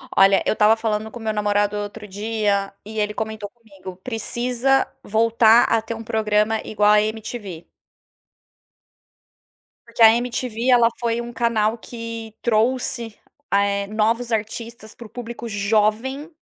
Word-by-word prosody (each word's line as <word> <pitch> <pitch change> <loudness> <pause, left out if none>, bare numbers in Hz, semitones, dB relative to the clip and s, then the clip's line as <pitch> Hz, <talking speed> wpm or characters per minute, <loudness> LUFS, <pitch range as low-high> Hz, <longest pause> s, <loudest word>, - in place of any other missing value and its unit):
Olha, 195 0 +5
eu - - +2
estava 215 +1 +4
falando 220 -1 -2
com 240 - -9
meu 220 -1 -2
namorado 205 0 0
outro 205 +1 -6
dia, 205 -1 -1
e 220 0 -5
ele 210 0 0
comentou 220 -1 -5
comigo, 195 -6 -12
precisa 245 +4 0 0.2
voltar 225 +1 +4
a 225 -1 +1
ter 225 +1 -6
programa 215 0 +1
igual 210 -1 +2
a 210 0 +5
MTV. 215 -5 -5 2.2
Porque 235 0 -6
a 225 - +10
MTV, 245 0 -3
ela 235 -2 +5
foi 235 0 -1
canal 225 -2 +1
que 230 -1 -8
trouxe, 235 0 0 0.4
eh, 200 0 +2
novos 225 +3 0
artistas 225 +1 -4
pro 235 - -11
público 235 -1 -7
jovem, 220 +8 0
220 Hz, 130 wpm, -22 LUFS, 210-235 Hz, 2.2 s, a